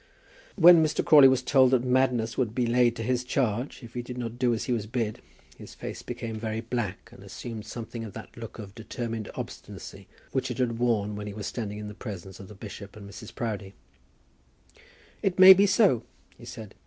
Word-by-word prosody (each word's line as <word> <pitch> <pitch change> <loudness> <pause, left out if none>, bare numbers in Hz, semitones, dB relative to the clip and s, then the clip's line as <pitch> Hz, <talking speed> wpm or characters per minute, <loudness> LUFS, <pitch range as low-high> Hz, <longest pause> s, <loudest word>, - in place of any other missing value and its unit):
When 175 -3 +8
Mr. 155 - 0
Crawley 145 -3 +9
was 130 -1 +2
told 130 -1 +5
that 125 -2 +2
madness 125 -3 +1
would 115 -4 -1
be 125 - +1
laid 120 0 +3
to 115 - -5
his 125 +1 0
charge 125 0 -1
if 115 - -11
he 120 - -3
did 125 +1 -8
not 120 -1 -5
do 125 -1 +3
as 115 - -1
he - - -3
was 110 -3 -2
bid, 115 -2 -3 0.4
his - - -11
face - - -7
became 110 -1 -6
very 110 0 -3
black, 115 -2 -4
and 110 -5 -14
assumed 110 +2 -8
something 115 0 -6
of 105 -4 -8
that - - -10
look 115 -2 -9
of 100 -3 -9
determined 115 0 -5
obstinacy - - -8 0.2
which 130 - -1
it 125 - -4
had 120 -3 -1
worn 105 -4 +1
when 105 0 -6
he 105 - -6
was 105 -1 -6
standing 105 -3 -4
in 105 0 -6
the 105 - -7
presence 95 -4 -8
of 95 - -10
the 105 - -12
bishop 100 0 -9
and 100 -2 -10
Mrs. 110 +3 -11
Proudie. 105 -4 -4 1.5
"It 195 -2 0
may 190 0 +11
be 200 +2 +4
so," 200 - +4 0.3
he - - -14
said. 110 -4 -9
115 Hz, 210 wpm, -27 LUFS, 105-125 Hz, 1.5 s, may